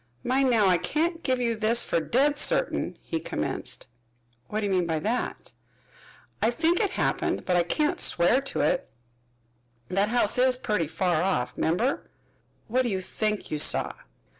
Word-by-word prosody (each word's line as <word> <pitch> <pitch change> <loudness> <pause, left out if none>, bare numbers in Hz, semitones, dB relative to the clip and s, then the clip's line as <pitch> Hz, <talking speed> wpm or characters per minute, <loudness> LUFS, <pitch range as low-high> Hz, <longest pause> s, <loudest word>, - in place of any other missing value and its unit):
"Mind 260 +1 +2
now, 225 -4 +4
I 180 -2 +4
can't 330 - -1
give 260 -5 0
you 235 -2 0
this 225 +2 +2
fer - - 0
dead 280 - +1
certain," - - 0
he - - -3
commenced. - - -3 0.6
"What 215 +1 -2
do - - -1
you 200 - -1
mean 180 -2 +1
by 160 -1 0
that?" 225 +10 -3 0.9
"I 225 - +3
think 330 +8 +1
it 410 - +1
happened, - - -1
but 180 - +1
I 175 - +4
can't 300 - 0
swear 205 +10 +3
to 275 - -2
it. - - 0 1.0
That 195 +3 +1
house 240 -1 +2
is 255 0 +4
putty 210 -9 -1
far 165 +1 0
off, 125 -10 0
remember." 220 - 0 0.6
"What 250 +3 +1
do 245 - -1
you 190 -3 -1
think 210 +2 -3
you 150 - -1
saw?" - - +2
225 Hz, 170 wpm, -26 LUFS, 180-260 Hz, 1.0 s, now